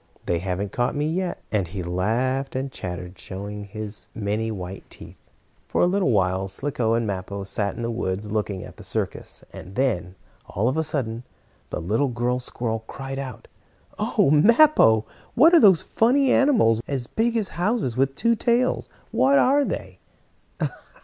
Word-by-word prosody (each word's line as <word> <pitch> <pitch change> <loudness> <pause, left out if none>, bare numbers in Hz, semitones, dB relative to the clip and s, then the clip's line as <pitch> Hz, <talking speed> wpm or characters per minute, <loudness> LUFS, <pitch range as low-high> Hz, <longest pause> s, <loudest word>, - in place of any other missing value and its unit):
They 85 - 0
haven't 95 +2 -3
caught 120 +3 0
me 145 +1 0
yet," 180 +3 -2
and 100 -5 0
he 95 +1 -5
laughed 120 +11 -1
and 135 +1 -2
chattered, 90 -1 -6
showing 100 +2 -6
his 105 +1 -7
many, 110 +1 -1
white 95 -2 -6
teeth. - - -13 0.5
For - - +1
a - - +6
little 185 -3 +2
while 95 -3 +1
Slicko 115 +2 -1
and 115 0 0
Mappo 100 0 -4
sat 100 +1 -2
in 120 - -5
the 115 - -1
woods 105 -2 -3
looking 105 -3 -2
at - - -12
the - - -11
circus, - - -4
and 95 +4 -10
then, 95 -9 0 0.3
all 105 +5 -1
of 130 - +1
a 160 - +1
sudden, 125 -7 -3 0.5
the - - -3
little 110 +11 +1
girl 125 0 -1
squirrel 115 -3 -3
cried 135 0 -6
out: 130 -5 -7 0.5
"Oh, 140 - +2
Mappo! 155 - +6 0.3
What 320 +8 +6
are 340 - +9
those 190 -7 +6
funny 260 +4 +3
animals, 220 - +4
as 135 -4 -2
big 230 - 0
as 215 -3 -1
houses, 180 - -1
with 135 +1 +1
two 235 +2 +2
tails? 240 +3 +1 0.2
What 280 +1 +4
are 280 +2 +4
they?" - - -5
120 Hz, 170 wpm, -24 LUFS, 100-155 Hz, 0.5 s, are